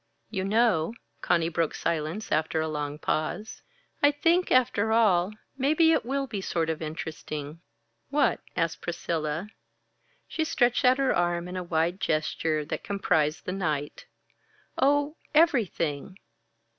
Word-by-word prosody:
"You 190 -3 -2
know," 215 -2 +2 0.3
Conny 165 -2 +2
broke 165 -1 -1
silence 165 +6 -2
after 160 +1 +1
a 160 - 0
long 150 -1 -3
pause 155 +8 -2 0.4
"I 290 - +7
think, 335 +5 +2
after 225 -4 +3
all, 205 -4 +3 0.3
maybe 310 +4 +4
it - - +2
will 275 +3 -1
be 215 -6 -5
sort 165 -3 -1
of 160 - -5
interesting." 155 -1 -6 0.5
"What?" 290 +1 +2 0.2
asked 165 -2 -1
Priscilla. 170 +1 -3 0.8
She 320 - -1
stretched 250 -6 +2
out 255 +1 +6
her 270 -1 +2
arm 175 0 0
in 180 - -7
a 185 - -2
wide 170 +2 0
gesture 155 -2 0
that - - -4
comprised 160 -6 0
the - - -2
night. 155 -6 -3 0.7
"Oh, 290 +3 +2 0.2
everything!" 195 - +2
180 Hz, 135 wpm, -27 LUFS, 160-245 Hz, 0.8 s, I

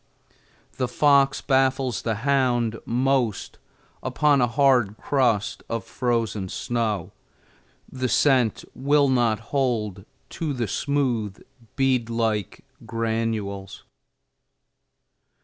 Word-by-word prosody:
The 125 - 0
fox 140 +1 +3
baffles 130 -2 +1
the 110 -2 -1
hound 120 -5 +1
most 125 -2 0 0.4
upon 145 -3 +2
a 120 - +3
hard 120 -5 +2
crust 120 -7 0
of 115 -3 -2
frozen 115 -5 -2
snow; 105 -6 -2 0.8
the 130 -1 -3
scent 130 -6 +2
will 140 +1 +2
not 120 -4 +2
hold 110 -8 -1 0.3
to 155 -3 -3
the 120 -4 -2
smooth, 120 -6 -1 0.4
bead 130 -4 +1
like 115 0 -2 0.2
granules. 110 -4 -3
120 Hz, 95 wpm, -24 LUFS, 110-135 Hz, 0.8 s, fox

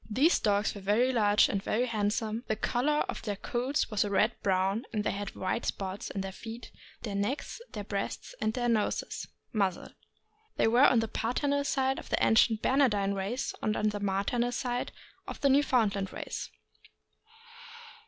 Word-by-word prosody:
These 275 +11 +3
dogs 205 -1 +1
were 200 - -8
very 225 +7 +2
large 210 -3 +4
and 195 - -1
very 230 +4 0
handsome; 220 0 -1
the 220 - 0
color 260 +7 +1
of - - -4
their 205 -3 -3
coats 250 +7 -1
was 210 - +2
a 205 - -3
red 205 +3 +3
brown, 195 +3 +1
and 210 -3 -1
they - - 0
had 200 0 -5
white 190 +5 -2
spots 195 0 -3
on 195 - -1
their 195 0 -4
feet, 225 +4 -9 0.3
their 210 -4 -4
necks, 205 - -2
their 210 - -4
breasts, 200 - -4
and 215 - +1
their 245 -1 0
noses 225 -3 -1
(? - - -46
muzzle). 195 -5 0 0.7
They - - +3
were 245 +5 +6
on 240 -3 +4
the 225 - -2
paternal 280 +6 0
side 265 -1 0
of - - -11
the - - +2
ancient 225 0 +4
Bernardine 210 -8 +3
race, 200 +6 -2
and 215 0 0
on 215 - +2
the 210 0 -4
maternal 205 +5 0
side 245 0 -2 0.4
of - - -6
the 280 - +4
Newfoundland 225 -8 +2
race. - - -5
220 Hz, 180 wpm, -30 LUFS, 200-245 Hz, 0.7 s, were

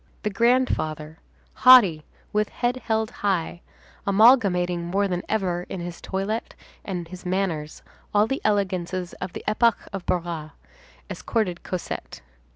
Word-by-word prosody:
The 210 - -1
grandfather, 195 -9 0 0.3
haughty, 200 -12 +6 0.3
with 210 0 +1
head 245 +1 -1
held 220 -2 -1
high, 180 -4 -1 0.5
amalgamating 195 -5 +4
more 195 +4 0
than 180 -2 -2
ever 180 -5 -1
in 190 - -5
his 175 0 -7
toilet 200 +4 -3 0.3
and 180 -4 -5
his 185 +2 -10
manners 180 -5 -2 0.3
all 210 0 +4
the 270 +4 -3
elegances 185 -3 -1
of 185 -1 -5
the - - -7
epoch 220 +1 +3 0.2
of 195 -2 -4
Barras, 165 -3 -2 0.5
escorted 195 -7 -2
Cosette. 185 - -6
190 Hz, 130 wpm, -24 LUFS, 175-215 Hz, 0.5 s, haughty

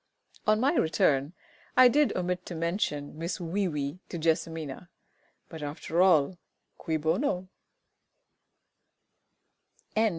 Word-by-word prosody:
On 215 0 +4
my 270 +6 +3
return 150 - +2 0.4
I 255 - +9
did 290 +4 +3
omit 180 0 -2
to 175 - -5
mention 165 -4 -2
Miss 170 +2 -3
WEE 185 +3 -1
WEE 145 0 -3
to 175 - -4
JESSIMINA; 160 -1 -2 0.6
but, 160 -2 -9
after 150 +3 -1
all, 175 -2 +4 0.4
cui 160 -2 -1
bono? 180 - 0
170 Hz, 105 wpm, -28 LUFS, 155-185 Hz, 0.6 s, I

